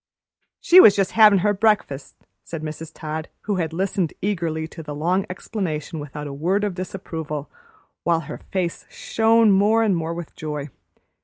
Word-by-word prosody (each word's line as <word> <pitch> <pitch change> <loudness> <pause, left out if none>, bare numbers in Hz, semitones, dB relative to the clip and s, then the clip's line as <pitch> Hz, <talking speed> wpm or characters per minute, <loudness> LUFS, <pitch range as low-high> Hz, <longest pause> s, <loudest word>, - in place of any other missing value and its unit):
"She 360 - +7
was 205 - +9
just 195 -2 +1
havin' 215 -2 +6
her 205 - +3
breakfast," 200 -10 0 0.3
said 165 -2 -7
Mrs. 155 +1 -6
Todd, 155 +1 -5
who 205 -2 -2
had 165 -3 -1
listened 185 -1 -1
eagerly 165 -5 -2
to 165 - -9
the 150 -2 -7
long 180 +6 0
explanation 175 -5 -4
without 145 0 -7
a 145 - -6
word 180 +8 0
of 205 -2 -1
disapproval, 160 -5 -6 0.5
while 165 -1 +2
her 150 -1 -8
face 180 -3 -2
shone 225 -1 +3
more 210 +4 +4
and 205 -4 +2
more 165 0 -3
with 170 -2 -8
joy. 150 -2 -5
170 Hz, 165 wpm, -22 LUFS, 155-200 Hz, 0.5 s, was